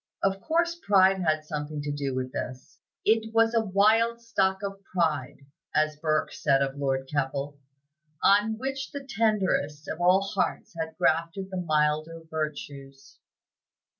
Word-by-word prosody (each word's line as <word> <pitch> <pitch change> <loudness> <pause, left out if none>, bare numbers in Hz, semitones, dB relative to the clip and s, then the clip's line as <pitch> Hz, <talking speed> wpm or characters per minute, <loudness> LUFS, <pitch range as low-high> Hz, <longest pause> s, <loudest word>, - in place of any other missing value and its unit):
Of 195 0 +1
course, 340 +1 0
pride 190 -1 +4
had 155 -2 +1
something 150 0 -4
to 145 - -2
do 140 -2 -3
with 130 0 -3
this; 130 +1 -6 0.3
"it 220 +1 +2
was 225 0 +4
a 230 - +3
wild 220 +3 +3
stock 195 -4 0
of 195 0 -5
pride," 150 -8 -2 0.3
as 155 0 +2
Burke 155 +1 0
said 140 -2 +2
of 135 0 -3
Lord 135 -1 -1
Keppel, 140 0 -2 0.6
"on 210 +2 +4
which 270 +2 -4
the 280 -1 -7
tenderest 195 - 0
of 175 - -5
all 180 +2 +5
hearts 195 - -2
had 160 -1 -5
grafted 165 +4 0
the 185 - -3
milder 155 0 0
virtues." 145 -3 -6
165 Hz, 145 wpm, -27 LUFS, 145-205 Hz, 0.6 s, all